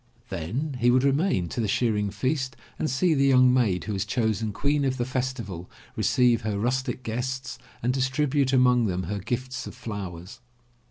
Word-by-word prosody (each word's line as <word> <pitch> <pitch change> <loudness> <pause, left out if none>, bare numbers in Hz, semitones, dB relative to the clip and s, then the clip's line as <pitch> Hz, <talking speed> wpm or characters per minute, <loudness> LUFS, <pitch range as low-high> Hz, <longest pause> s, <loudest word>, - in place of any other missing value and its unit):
Then 115 - -3
he 120 0 +4
would 125 +1 +4
remain 140 - +2
to 120 - -2
the 110 - 0
shear 115 +2 +1
ing 105 -1 0
feast 130 +4 -2 0.2
and 155 - 0
see 150 +7 +2
the 140 -2 +3
young 130 -1 +6
maid 110 -8 +2
who 105 - -3
was 95 - -1
chosen 110 -2 -1
Queen 140 +8 0
of 130 -1 0
the 120 - -1
Festival 125 -9 -4 0.3
receive 120 -3 +3
her 105 -1 -2
rustic 125 +3 -1
guests 125 +3 -4 0.2
and 125 +2 +2
distribute 135 +1 +1
among 125 -3 +4
them 90 -1 -2
her 100 +4 -3
gifts 130 +5 -4
of - - -9
flowers. 100 -2 -7
125 Hz, 180 wpm, -26 LUFS, 105-130 Hz, 0.3 s, young